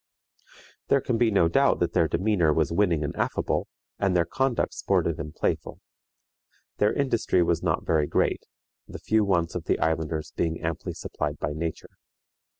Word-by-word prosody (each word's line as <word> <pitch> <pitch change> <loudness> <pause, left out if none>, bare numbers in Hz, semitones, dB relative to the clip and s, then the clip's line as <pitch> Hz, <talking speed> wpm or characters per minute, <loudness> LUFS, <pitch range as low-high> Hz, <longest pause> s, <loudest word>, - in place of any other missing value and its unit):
" - - -25
There 140 - +5
can 120 -3 -1
be 120 - +4
no 95 -6 +3
doubt 135 +11 +3
that 85 - 0
their 85 -3 +3
demeanor 90 -3 +2
was 80 -1 +1
winning 85 -4 +2
and 75 - -4
affable, - - -1 0.3
and 95 -2 +1
their 85 -1 +3
conduct 130 +7 0
sportive 85 0 0
and 75 0 -5
playful. - - -2 1.0
Their 105 +1 +3
industry 115 -9 +1
was 85 -1 0
not - - -1
very 75 -2 +2
great, - - +1 0.5
the - - -8
few 110 0 +1
wants 85 -4 +1
of 85 -2 -5
the - - +1
islanders 80 -1 -1
being 80 -1 -1
amply 85 -1 -3
supplied 75 0 -4
by 75 - -3
nature. 80 +1 -6
85 Hz, 170 wpm, -26 LUFS, 80-105 Hz, 1.0 s, There